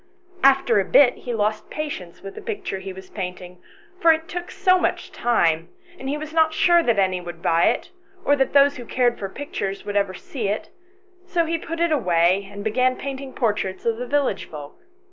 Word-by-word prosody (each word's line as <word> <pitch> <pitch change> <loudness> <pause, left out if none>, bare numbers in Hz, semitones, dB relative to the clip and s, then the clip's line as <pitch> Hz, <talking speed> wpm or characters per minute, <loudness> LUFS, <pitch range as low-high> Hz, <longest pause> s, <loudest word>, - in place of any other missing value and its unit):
After 265 -5 +5
a - - +2
bit 250 +6 +5
he 245 - -6
lost 215 0 -1
patience 285 - -6
with 195 0 -7
the - - -9
picture 410 - -4
he 190 0 -7
was 190 0 -12
painting, 180 -2 -6 0.4
for 335 - +7
it 320 0 0
took 355 0 -5
so 370 -1 +3
much - - -1
time, 170 -8 +1 0.3
and 265 - -5
he 290 - -1
was 310 +1 -7
not 320 -1 +3
sure 345 +1 +5
that 235 -9 +1
any 185 -2 +1
would 175 0 -9
buy 170 -2 +3
it, - - 0 0.3
or 285 - +4
that 270 -2 0
those 280 0 +5
who 245 - -8
cared 245 0 +1
for 195 - -4
pictures 195 -6 -5
would 205 - -4
ever 200 -2 +1
see 225 +3 -5
it, 205 +2 -2 0.5
and 370 0 -29
so 345 -3 +1
he 330 0 -1
put 330 0 -6
it 340 -1 +2
away, 185 - +2
and 205 0 -7
began 255 +4 +2
painting 270 0 -6
portraits 210 -7 -2
of 230 -1 +1
the 250 +1 -5
village 280 -8 0
folk. 145 -2 -9
235 Hz, 210 wpm, -23 LUFS, 190-290 Hz, 0.5 s, for